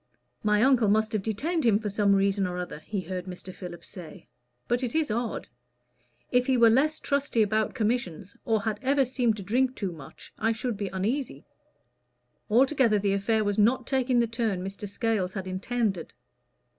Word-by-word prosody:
"My 210 0 +3
uncle 255 -4 +4
must 220 +2 +2
have 215 - 0
detained 285 - -1
him 225 -4 +4
for 210 -1 -4
some 200 0 +3
reason 195 0 +2
or 180 0 -4
other," 180 -4 -5
he 200 +4 -4
heard 180 +1 -5
Mr. 185 0 -8
Philip 175 -2 -9
say; 180 0 -11 0.4
"but 240 +1 +1
it 250 0 -3
is 315 -7 +1
odd. 235 +1 -2 0.8
If 250 0 +2
he 260 -1 +3
were 230 -1 +6
less 300 +6 +2
trusty 280 -5 +1
about 215 +2 0
commissions, 210 -6 -2
or 220 -2 +1
had 215 -1 -2
ever 275 +1 +2
seemed 245 -3 0
to 200 - -6
drink 255 +6 +1
too 195 -3 -3
much, 155 -5 -12
I 225 +1 +2
should 225 +1 -3
be 200 0 -3
uneasy." 220 +9 -3 1.0
Altogether 250 -1 +4
the 200 -1 +1
affair 215 +2 +1
was 205 0 0
not 240 +4 +3
taking 255 -2 +1
the 235 - +3
turn 225 -5 -2
Mr. 195 +1 -6
Scales 200 -3 -1
had 190 -2 -4
intended. 190 -1 -2
220 Hz, 180 wpm, -27 LUFS, 195-245 Hz, 1.0 s, were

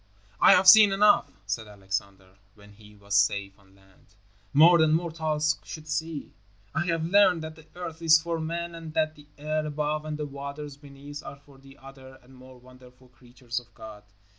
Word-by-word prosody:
"I - - +7
have 185 +1 +3
seen 210 +1 +9
enough," 205 +2 +3
said 105 +3 -4
Alexander, 100 -1 -7 0.2
when 105 -1 -18
he 105 0 -18
was 100 0 -9
safe 100 -1 +1
on 95 -1 -25
land, 95 0 -26 0.4
"more 170 - +6
than 160 -1 +3
mortals 155 -2 -1
should 155 -1 -10
see. 160 -1 -4 0.4
I 175 +2 -2
have 165 -1 -1
learned 185 -2 +3
that 160 0 -7
the 160 0 -18
earth 170 -2 -8
is 160 -1 +5
for 165 0 -4
man 170 +2 -4
and 165 -1 -10
that 155 -1 0
the 145 -1 -18
air 155 +1 -2
above 150 0 -3
and 155 -1 -5
the 150 - -4
waters 140 +1 -8
beneath 145 0 -11
are - - -9
for 140 -1 -21
the 135 0 -17
other 135 -1 -14
and 130 +2 -20
more 130 0 -15
wonderful 125 0 -19
creatures 120 0 -7
of 120 -1 -20
God." 110 -2 -11
145 Hz, 190 wpm, -26 LUFS, 120-160 Hz, 0.4 s, seen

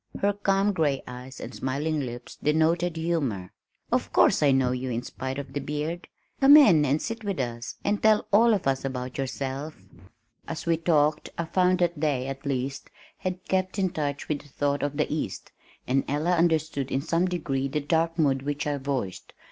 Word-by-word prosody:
her 205 +1 +2
calm 200 0 +1
gray 150 -6 0
eyes 125 +2 -9
and - - -7
smiling 150 +4 -2
lips 120 -3 -6
denoted 165 +3 +2
humor. 140 - -1 0.4
"Of - - 0
course - - +4
I 145 - +5
know 130 -2 +3
you 125 +1 -3
in 120 0 -2
spite 130 +1 -5
of 140 -2 -6
the 145 - -1
beard. 150 +5 -4 0.3
Come 280 +2 +9
in 175 - +6
and 145 +2 +2
sit 225 +3 -5
with 200 -5 -2
us 120 0 -4
and 205 0 +1
tell 215 -1 +4
all 225 +2 +6
of 195 - -4
us 135 -1 +1
about 130 -1 -4
yourself." 135 +3 -4 0.7
As 165 - -5
we 170 -1 +3
talked, 155 -2 +2
I 170 - -1
found 185 +2 +2
that 170 -3 0
they, 140 -5 +1
at 135 +1 -6
least, 135 +1 -3 0.3
had 185 -1 -4
kept 185 +1 0
in 190 -3 +1
touch 145 -5 -3
with 150 -2 -2
the 145 - -18
thought 145 +1 -1
of 145 0 -2
the 150 - +2
east, 155 - -4 0.3
and 135 +1 +1
Ella 150 +5 0
understood 160 -5 +1
in 135 - 0
some 165 +3 +1
degree 140 -7 -1
the 145 +2 -1
dark 165 +3 0
mood 140 -5 +2
which 145 +3 -3
I 145 -1 -1
voiced. 130 -9 -4
150 Hz, 195 wpm, -26 LUFS, 135-170 Hz, 0.7 s, Come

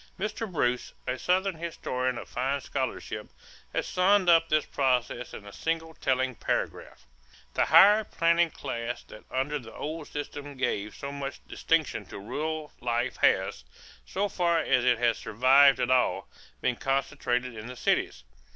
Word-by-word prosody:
Mr. 215 +1 -3
Bruce, 125 -7 0
a 125 0 -2
Southern 190 +2 +1
historian 130 -6 -3
of - - -7
fine 135 +3 -1
scholarship, 130 -1 -4 0.4
has - - -1
summed 185 0 +3
up 165 -1 +5
this 155 0 +2
process 125 -3 0
in 105 - -9
a 100 - -11
single 165 0 -2
telling 130 -3 0
paragraph: - - -3 0.5
"The - - +2
higher 210 +2 +7
planting 170 -3 +2
class 120 -4 -5
that 105 - -14
under 145 +3 -1
the 110 -3 -12
old 155 0 -5
system 145 -1 -6
gave 110 -5 -2
so 140 - -6
much 140 -1 -6
distinction 165 -3 0
to - - -8
rural 150 +9 -4
life 120 +1 -1
has, 60 - +2 0.4
so 200 +2 -1
far 175 -3 +1
as 130 -6 +2
it 125 -1 +4
has 120 0 +1
survived 130 +4 +5
at 125 - +1
all, 130 -1 +2 0.3
been 125 - 0
concentrated 125 -3 -1
in 110 +1 -7
the 125 - -8
cities. - - 0
135 Hz, 155 wpm, -28 LUFS, 125-165 Hz, 0.5 s, higher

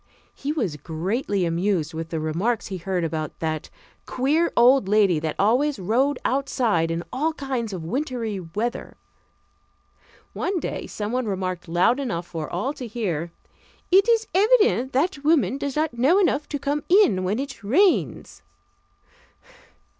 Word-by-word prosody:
He 280 - -4
was 215 - -2
greatly 185 - -2
amused 170 -1 0
with 165 0 -5
the 165 - -3
remarks 180 +11 -1
he 190 - -4
heard 180 0 -2
about 155 -2 -3
that 155 -1 -3 0.4
"queer 300 +7 +1
old 245 -2 +5
lady 200 -5 +3
that 155 -1 -3
always 255 +8 +2
rode 245 +9 +1
outside 245 -11 +1
in 165 +1 -2
all 310 +5 0
kinds 260 -7 -3
of 180 -4 -5
wintry 235 - -3
weather." 210 +8 -4 1.4
One 370 -1 -1
day - - -4
someone 225 +3 -3
remarked 185 -3 -3
loud 175 +10 +2
enough 205 -11 -3
for 165 -3 -6
all 210 +11 -2
to 255 -4 -7
hear: 175 -8 -3 0.6
"It 390 +5 +5
is 455 -1 +3
evident 410 - +3
that 290 +2 0
woman 280 - +2
does 280 -2 -3
not 310 -3 0
know 265 +10 +3
enough 305 -7 +1
to 290 - -2
come 285 +2 -2
in 340 - +4
when 195 +4 0
it 270 -4 -6
rains." 350 - +1
230 Hz, 145 wpm, -24 LUFS, 180-280 Hz, 1.4 s, old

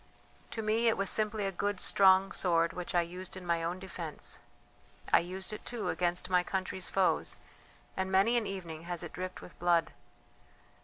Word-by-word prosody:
"To 225 - -4
me 220 +2 +2
it 225 - +3
was 195 0 +2
simply 215 -1 +1
a 195 - 0
good 200 +1 -2
strong 190 0 +5
sword 170 -2 +2
which 180 0 -5
I 175 - +5
used 180 +2 -7
in 185 - -9
my 170 -1 +1
own 170 +2 -2
defence. 180 -4 -5 0.7
I - - +9
used 190 +4 -5
it, 215 - -7
too, 240 -3 -3
against 175 0 0
my 180 -1 +4
country's 190 0 -2
foes, 190 -2 +2 0.6
and 190 0 -2
many 195 +5 +4
an 235 -3 +1
evening 170 -4 -6
has 175 0 -3
it 170 - -7
dripped 185 0 -5
with - - -13
blood. 175 -1 +3
185 Hz, 185 wpm, -32 LUFS, 175-195 Hz, 0.7 s, I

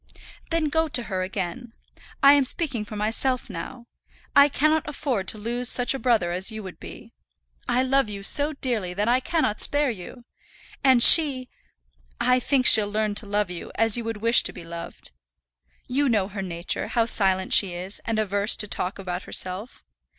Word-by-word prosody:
"Then 330 -2 0
go 320 +2 0
to 250 -5 +1
her 190 -5 -4
again. 195 +5 -6 0.5
I 280 +1 +8
am 285 -1 +3
speaking 260 -5 -2
for 215 - -10
myself 225 +4 -1
now. 200 +8 -8 0.5
I 285 +1 +6
cannot 310 +3 0
afford 255 -9 -3
to - - -3
lose 240 +3 -3
such 245 +1 +1
a 270 - -5
brother 225 -10 +1
as 185 +5 -1
you 220 -1 -8
would 185 -2 -11
be. - - -12 0.6
I 255 - +1
love 270 -2 +1
you 200 -1 -8
so 290 +8 +3
dearly 225 -10 -4
that 205 +3 -2
I 245 +2 +2
cannot 260 -6 -2
spare 290 -2 +3
you. 230 +4 -11 0.6
And 260 -3 +5
she, 275 -6 +7 0.7
I 250 - +2
think 255 0 0
she'll 215 -3 +6
learn 215 0 -2
to 205 +1 -3
love 205 -2 -1
you 175 - -8
as 225 -1 +2
you 240 - -2
would 225 -1 -5
wish 230 +1 +5
to - - -5
be - - -11
loved. 170 0 -9 0.7
You 275 +2 -1
know 210 -5 0
her 200 -1 -6
nature, 170 -2 -4
how 230 -1 0
silent 190 -4 0
she 185 -4 +3
is, 185 +3 -6
and 225 -1 -3
averse 205 -1 +2
to 210 - +2
talk 195 +1 -4
about 180 -2 -5
herself. 185 +6 -2
225 Hz, 185 wpm, -23 LUFS, 195-260 Hz, 0.7 s, I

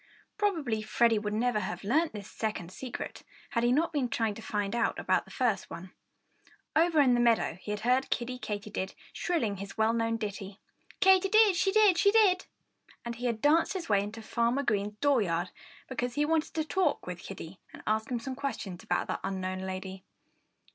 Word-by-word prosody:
Probably 320 - 0
Freddie 225 +1 +3
would 210 0 -3
never 235 -1 +1
have 210 +1 -4
learned 305 +11 +2
this 205 -2 -7
second 200 -6 -3
secret 250 +5 -6 0.3
had 235 -4 0
he 240 - +3
not 325 +6 +2
been 270 -5 0
trying 225 -2 0
to 225 - -10
find 205 -1 -2
out 235 -1 +1
about - - +1
the - - -17
first 235 -7 0
one. 185 +2 -8 0.8
Over 325 -1 +4
in 255 -3 +5
the 240 - +3
meadow 230 -6 +2
he - - -9
had 210 0 -2
heard 250 +3 +2
Kiddie 250 +1 -2
Katydid 205 -3 -4 0.2
shrilling 235 - -1
his 200 +3 -8
well 220 +1 +3
worn 230 0 0
ditty, 200 -2 -5 0.4
Katy 380 0 +5
did; 430 -2 +6
she 385 +2 +2
did, 410 -4 +5
she 400 - +5
did! 400 -4 +4 0.6
And 235 - -3
he 245 +1 -2
had 225 -2 -2
danced 315 +3 +4
his 365 -8 -5
way 200 -2 +4
into 215 +2 -6
Farmer 235 +5 0
Green's 210 -3 0
dooryard 190 -11 +2 0.4
because 245 -2 -3
he 295 0 +2
wanted 315 0 0
to 320 - +1
have - - -3
a - - -25
talk 365 -4 +1
with 180 -1 -6
Kiddie 190 -2 -9
and - - -12
ask 220 +3 0
him 250 - -1
some 260 +3 -5
questions 255 -9 -5
about - - 0
that - - -3
unknown 185 -1 -3
lady. 190 0 -6
230 Hz, 200 wpm, -30 LUFS, 205-290 Hz, 0.8 s, did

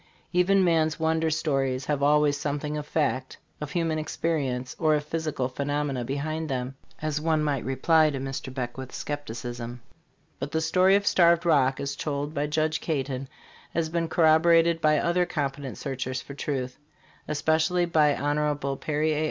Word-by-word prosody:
Even 190 +2 +4
man's 160 -3 +2
wonder 160 0 +1
stories 135 -4 0
have 145 -2 -1
always 145 0 +4
something 145 +1 -3
of 150 -1 -5
fact, 135 -5 -1 0.2
of 150 - -4
human 165 -2 0
experience, 140 -5 -2
or 155 -2 +3
of 150 - -1
physical 155 -4 -2
pheno 145 +3 -2
mena 135 -4 -2
behind 155 +5 -3
them, 130 -1 -2 0.3
as 150 -1 -1
one 160 -1 +1
might 140 -5 0
reply 155 +5 +3
to 140 - -3
Mr. 135 0 -5
Beckwith's 130 0 -5
skepticism. 120 -4 -5 0.6
But 145 - -5
the 160 - +2
story 185 +4 +4
of 200 0 +1
Starved 170 -2 +4
Rock, 135 -5 +3
as 140 0 -3
told 145 0 -3
by 145 -1 -1
Judge 155 +1 0
Caton, 135 -4 -2 0.5
has 165 -1 0
been 165 0 -1
corroborated 165 +1 +4
by 155 0 +4
other 175 +3 +1
competent 140 -4 -3
searchers 130 -2 -3
for 140 - -9
truth, 130 -3 -4 0.5
especially 160 +4 +1
by 155 -4 +3
Hon. 145 -1 -1
Perry 155 +1 0
A. 150 - -1
150 Hz, 160 wpm, -26 LUFS, 135-160 Hz, 0.6 s, Even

